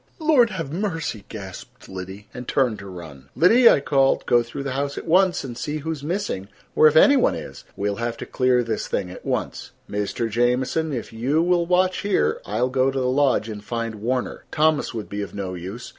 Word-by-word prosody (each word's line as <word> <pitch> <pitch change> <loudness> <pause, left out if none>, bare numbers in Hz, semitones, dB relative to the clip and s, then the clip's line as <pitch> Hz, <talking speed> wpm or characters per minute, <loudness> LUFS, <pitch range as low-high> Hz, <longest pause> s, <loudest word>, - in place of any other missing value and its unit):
"Lord 305 -8 +4
have 165 -8 -5
mercy!" 165 - -3
gasped 95 -4 -10
Liddy, 95 +2 -8
and 125 0 -8
turned 125 -5 +1
to 100 - -9
run. 80 -7 -11
"Liddy," 230 - +6
I - - +4
called, 135 -1 +2
"go 120 - +4
through 120 +4 -6
the 140 - -3
house 140 +2 -2
at - - -6
once 185 +2 +3
and 125 -3 -6
see 150 +4 -3
who 155 +2 -4
is 150 -3 -6
missing, 170 - -3 0.3
or 155 - +7
if 155 - +2
any 280 - +7
one 260 - +3
is. - - -9
We'll 100 0 -1
have 115 0 -3
to - - -6
clear 125 -1 +2
this 115 -2 -3
thing 90 - -2
at - - -11
once. - - -3
Mr. 105 +3 -2
Jamieson, 125 +7 0
if 120 -4 -5
you 135 +8 +1
will 175 -1 +2
watch 185 +1 +2
here 80 - +1
I 105 +3 -2
will 125 - +2
go 130 +1 +2
to 135 0 -2
the 130 - -1
lodge 130 -3 +2
and 105 -2 -7
find 115 -2 -4
Warner. 125 +3 -2
Thomas 155 -1 +2
would 110 -3 -6
be 100 0 -4
of 100 -4 -7
no 95 -2 -4
use. 95 +7 -7
125 Hz, 220 wpm, -23 LUFS, 105-160 Hz, 0.3 s, or